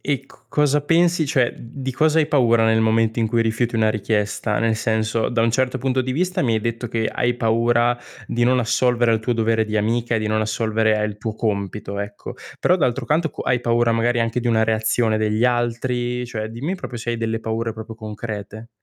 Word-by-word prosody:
e 140 Hz, -2 st, -1 dB
c -, -, -22 dB
cosa 150 Hz, 0 st, +2 dB
pensi 165 Hz, +2 st, +2 dB
cioè, 130 Hz, -3 st, +2 dB
uhm, -, -, -16 dB
di 130 Hz, +3 st, -6 dB
cosa 155 Hz, +4 st, +2 dB
hai 155 Hz, -, +3 dB
paura 115 Hz, -6 st, +3 dB
nel 110 Hz, 0 st, +3 dB
momento 110 Hz, +1 st, +2 dB
in 115 Hz, -, +2 dB
cui 115 Hz, +1 st, +1 dB
rifiuti 115 Hz, +1 st, -1 dB
una 110 Hz, -1 st, +3 dB
richiesta? 105 Hz, 0 st, -1 dB
Nel 115 Hz, -1 st, +1 dB
senso, 110 Hz, 0 st, 0 dB
da 120 Hz, -2 st, 0 dB
un 115 Hz, -, +3 dB
certo 130 Hz, +2 st, 0 dB
punto 130 Hz, 0 st, 0 dB
di 130 Hz, -, -3 dB
vista 180 Hz, +6 st, 0 dB
mi 120 Hz, -4 st, +1 dB
hai 110 Hz, -, 0 dB
detto 115 Hz, +2 st, -3 dB
che 110 Hz, -1 st, -1 dB
hai 120 Hz, 0 st, 0 dB
paura 120 Hz, +1 st, +2 dB, 0.3 s
di 120 Hz, 0 st, +1 dB
non 125 Hz, +1 st, +3 dB
assolvere 120 Hz, 0 st, +2 dB
al 110 Hz, -, +3 dB
tuo 110 Hz, +3 st, -1 dB
dovere 115 Hz, -1 st, +1 dB
di 110 Hz, 0 st, -3 dB
amica 115 Hz, +3 st, 0 dB
e 110 Hz, -, +1 dB
di 110 Hz, -, -2 dB
non 110 Hz, 0 st, +1 dB
assolvere 110 Hz, 0 st, +1 dB
al 105 Hz, -1 st, -2 dB
tuo 110 Hz, 0 st, -4 dB
compito, 100 Hz, -2 st, -3 dB
ecco. 100 Hz, 0 st, -6 dB, 0.3 s
Però 180 Hz, -, +3 dB
d'altro 130 Hz, -6 st, 0 dB
canto 155 Hz, +2 st, +1 dB
co -, -, -7 dB
hai 125 Hz, -, +1 dB
paura 120 Hz, 0 st, +2 dB
magari 120 Hz, +1 st, +1 dB
anche 115 Hz, +1 st, 0 dB
di 120 Hz, -, -2 dB
una 115 Hz, -1 st, +3 dB
reazione 110 Hz, 0 st, +1 dB
degli 110 Hz, +1 st, 0 dB
altri? 120 Hz, 0 st, 0 dB
Cioè 110 Hz, -3 st, -4 dB
dimmi 135 Hz, +12 st, -4 dB
proprio 130 Hz, -8 st, -7 dB
se 120 Hz, +1 st, -4 dB
hai 120 Hz, -, -1 dB
delle 115 Hz, 0 st, -2 dB
paure 115 Hz, +1 st, -2 dB
proprio 110 Hz, 0 st, -9 dB
concrete. 110 Hz, 0 st, -7 dB
115 Hz, 220 wpm, -21 LUFS, 110-125 Hz, 0.3 s, hai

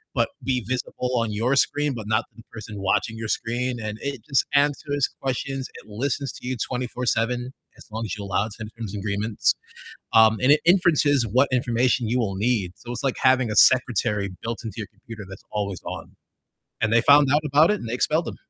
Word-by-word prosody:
but -, -, +2 dB
be 130 Hz, -2 st, 0 dB
visible 125 Hz, 0 st, -3 dB
on 115 Hz, -2 st, 0 dB
your 120 Hz, +6 st, +1 dB
screen, 145 Hz, 0 st, +1 dB
but 110 Hz, -3 st, -6 dB
not 110 Hz, +1 st, +1 dB
the 115 Hz, -, -14 dB
person 110 Hz, -1 st, -8 dB
watching 110 Hz, +3 st, 0 dB
your 115 Hz, -1 st, -4 dB
screen, 120 Hz, +3 st, -2 dB
and 105 Hz, -1 st, -5 dB
it 140 Hz, -4 st, -4 dB
just 135 Hz, -3 st, +2 dB
answers 145 Hz, -1 st, +1 dB
questions, 135 Hz, 0 st, -3 dB
it -, -, -12 dB
listens 130 Hz, +4 st, -2 dB
to -, -, -9 dB
you 130 Hz, -, -1 dB
24/7, 125 Hz, +1 st, -2 dB, 0.2 s
as -, -, -14 dB
long 110 Hz, +1 st, -4 dB
as 105 Hz, -, -4 dB
you 100 Hz, -, -6 dB
allow 100 Hz, +2 st, 0 dB
it 110 Hz, -, -8 dB
to 110 Hz, -, -6 dB
in 105 Hz, -, -7 dB
terms 110 Hz, -4 st, -6 dB
and 100 Hz, -, -4 dB
agreements, 105 Hz, +1 st, 0 dB, 0.6 s
um, 110 Hz, -1 st, +6 dB
and 130 Hz, +3 st, +5 dB
it 150 Hz, -, +6 dB
inferences 155 Hz, -7 st, +4 dB
what 125 Hz, +6 st, +3 dB
information 125 Hz, -1 st, +1 dB
you 125 Hz, +3 st, +1 dB
will 100 Hz, -4 st, -1 dB
need, 100 Hz, -4 st, 0 dB
so 120 Hz, -, -9 dB
it's 120 Hz, -, -5 dB
like 135 Hz, -2 st, 0 dB
having 130 Hz, -3 st, +4 dB
a 105 Hz, -, -2 dB
secretary 105 Hz, -5 st, +3 dB
built 115 Hz, 0 st, -3 dB
into 110 Hz, -, -6 dB
your 110 Hz, -, -4 dB
computer 110 Hz, 0 st, -10 dB
that's 95 Hz, 0 st, -11 dB
always 100 Hz, -4 st, -3 dB
on. -, -, -7 dB, 0.7 s
And 110 Hz, -, +1 dB
they 115 Hz, -, +5 dB
found 140 Hz, +1 st, +6 dB
out 150 Hz, -, +4 dB
about 150 Hz, +6 st, +5 dB
it, 210 Hz, -, 0 dB
and 115 Hz, -, -7 dB
they 115 Hz, -, -3 dB
expelled 155 Hz, +6 st, +1 dB
him. -, -, -5 dB
120 Hz, 215 wpm, -24 LUFS, 110-135 Hz, 0.7 s, um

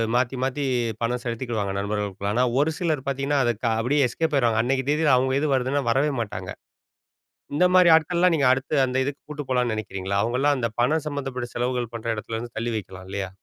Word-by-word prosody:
மாத்தி, 125 Hz, +1 st, +1 dB
மாத்தி 135 Hz, +2 st, -1 dB, 0.4 s
பணம் 120 Hz, +1 st, -1 dB
செலுத்திக்குவாங்க 115 Hz, -4 st, -2 dB
நண்பர்களுக்குள்ள. 100 Hz, -1 st, -2 dB
ஆனா 125 Hz, +3 st, +2 dB, 0.2 s
ஒரு 160 Hz, +2 st, +1 dB
சிலர் 155 Hz, -7 st, -1 dB
பாத்தீங்கன்னா, 140 Hz, +1 st, 0 dB
அதுக்கு 120 Hz, 0 st, 0 dB
அப்டியே 135 Hz, +3 st, +2 dB
எஸ்கேப் 160 Hz, +5 st, -1 dB
ஆய்ருவாங்க. 115 Hz, -4 st, +2 dB
அன்னைக்கு 130 Hz, +1 st, 0 dB
தேதில 150 Hz, -2 st, +3 dB
அவங்க 130 Hz, +1 st, +1 dB
இது 155 Hz, -, 0 dB
வருதுன்னா 130 Hz, +2 st, 0 dB
வரவே 140 Hz, +4 st, +2 dB
மாட்டாங்க. 110 Hz, -, -5 dB, 1.1 s
இந்த 180 Hz, -, +4 dB
மாரி 180 Hz, -1 st, +7 dB
ஆட்கள்லாம் 170 Hz, +2 st, +2 dB
நீங்க 140 Hz, -4 st, +3 dB
அடுத்து 130 Hz, +4 st, -2 dB
அந்த 130 Hz, 0 st, -2 dB
இதுக்கு 140 Hz, +1 st, -5 dB
கூட்டு 150 Hz, -1 st, -5 dB
போலாம்னு 125 Hz, -2 st, +1 dB
நினைக்கிறீங்களா? 100 Hz, -2 st, -3 dB
அவங்கலாம் 130 Hz, +5 st, +1 dB
அந்தப் 115 Hz, -3 st, -3 dB
பணம் 155 Hz, +5 st, +1 dB
சம்பந்தப்பட்ட 135 Hz, -4 st, -4 dB
செலவுகள் 125 Hz, -1 st, -1 dB
பண்ற 115 Hz, 0 st, -6 dB
இடத்துலருந்து 115 Hz, +2 st, -6 dB
தள்ளி 115 Hz, +1 st, -2 dB
வைக்கலாம் 95 Hz, -2 st, -9 dB
இல்லையா? 100 Hz, -1 st, -3 dB
125 Hz, 180 wpm, -24 LUFS, 115-145 Hz, 1.1 s, மாரி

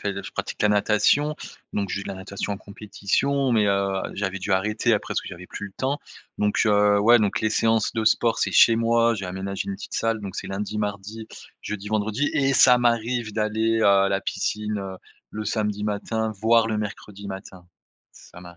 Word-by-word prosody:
fais 100 Hz, -, -2 dB
je -, -, -8 dB
pratique -, -, -5 dB
la 105 Hz, -, +4 dB
natation, 105 Hz, +9 st, +2 dB, 0.4 s
donc 100 Hz, -3 st, -2 dB
je -, -, -2 dB
vais 100 Hz, -, -6 dB
de -, -, -7 dB
la -, -, -4 dB
natation 100 Hz, +2 st, -5 dB
en -, -, -3 dB
compétition, 110 Hz, +7 st, -1 dB
mais, 110 Hz, -3 st, +3 dB
heu, 100 Hz, 0 st, +1 dB, 0.3 s
j'avais 95 Hz, -1 st, -3 dB
dû 95 Hz, +1 st, -2 dB
arrêter 105 Hz, +4 st, +1 dB
après 105 Hz, -, -1 dB
parce -, -, 0 dB
que -, -, -13 dB
j'avais 90 Hz, 0 st, -10 dB
plus 100 Hz, -, -6 dB
le 95 Hz, -, -13 dB
temps. 135 Hz, +6 st, -2 dB, 0.4 s
Donc, 105 Hz, 0 st, +1 dB
heu, 105 Hz, 0 st, +4 dB
ouais, 120 Hz, +3 st, +6 dB
donc 105 Hz, -2 st, 0 dB
les 110 Hz, -, +1 dB
séances 115 Hz, +1 st, +1 dB
de 110 Hz, -2 st, -2 dB
sport, 115 Hz, +1 st, +2 dB
c'est -, -, 0 dB
chez 115 Hz, -1 st, +6 dB
moi. 115 Hz, 0 st, +3 dB
J'ai 95 Hz, -2 st, -5 dB
aménagé 95 Hz, +2 st, -4 dB
une 100 Hz, -, -2 dB
petite -, -, -9 dB
salle, 115 Hz, -1 st, 0 dB
donc 100 Hz, -1 st, -7 dB
c'est -, -, -5 dB
lundi, 105 Hz, +2 st, -4 dB
mardi, 105 Hz, +2 st, -4 dB, 0.3 s
jeudi, 105 Hz, 0 st, -6 dB
vendredi 110 Hz, +6 st, 0 dB
et 140 Hz, -1 st, +2 dB
ça 125 Hz, -1 st, +7 dB
m'arrive 120 Hz, -1 st, 0 dB
d'aller, 110 Hz, +1 st, 0 dB
heu, -, -, +4 dB
à 100 Hz, 0 st, +5 dB
la 100 Hz, 0 st, 0 dB
piscine, 105 Hz, +1 st, -2 dB
heu, 95 Hz, -1 st, -6 dB, 0.3 s
le 110 Hz, 0 st, -5 dB
samedi 105 Hz, -1 st, -1 dB
matin, 110 Hz, +2 st, -2 dB
voir 115 Hz, 0 st, +4 dB
le 110 Hz, -1 st, -1 dB
mercredi 100 Hz, -1 st, -7 dB
matin. 95 Hz, -2 st, -9 dB, 0.5 s
Ça 85 Hz, -, -15 dB
m'arrive. -, -, -13 dB
105 Hz, 210 wpm, -24 LUFS, 100-115 Hz, 0.5 s, ça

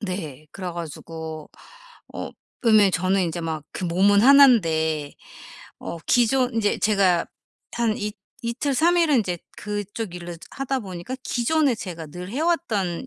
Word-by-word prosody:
네. 160 Hz, -8 st, -5 dB
그래 185 Hz, -2 st, -5 dB
가지고 160 Hz, -1 st, -7 dB, 0.6 s
어 -, -, -5 dB, 0.3 s
그러면 215 Hz, -5 st, +5 dB
저는 185 Hz, +2 st, +1 dB
인제 170 Hz, 0 st, -3 dB
막 160 Hz, -2 st, -3 dB
그 185 Hz, -, -4 dB
몸은 195 Hz, +4 st, +4 dB
1 280 Hz, +3 st, +9 dB
인데 160 Hz, -, +1 dB, 0.7 s
어 170 Hz, -, -6 dB
기존 245 Hz, +1 st, +3 dB
이제 210 Hz, -2 st, +1 dB
제가 195 Hz, -5 st, +2 dB, 0.5 s
한 230 Hz, -2 st, 0 dB
이 210 Hz, 0 st, -3 dB, 0.3 s
이틀, 245 Hz, +5 st, -1 dB
3 340 Hz, +6 st, +3 dB
일은 310 Hz, -5 st, +4 dB
인제 180 Hz, -5 st, -1 dB, 0.2 s
그쪽 205 Hz, -1 st, -5 dB
일을 175 Hz, -1 st, -7 dB, 0.2 s
하다 270 Hz, -1 st, -2 dB
보니까 195 Hz, +6 st, -6 dB
기존에 275 Hz, +2 st, +1 dB
제가 170 Hz, -7 st, -7 dB
늘 180 Hz, +4 st, -8 dB
해 260 Hz, -, -4 dB
왔던 245 Hz, -, 0 dB
200 Hz, 245 characters per minute, -23 LUFS, 170-240 Hz, 0.7 s, 1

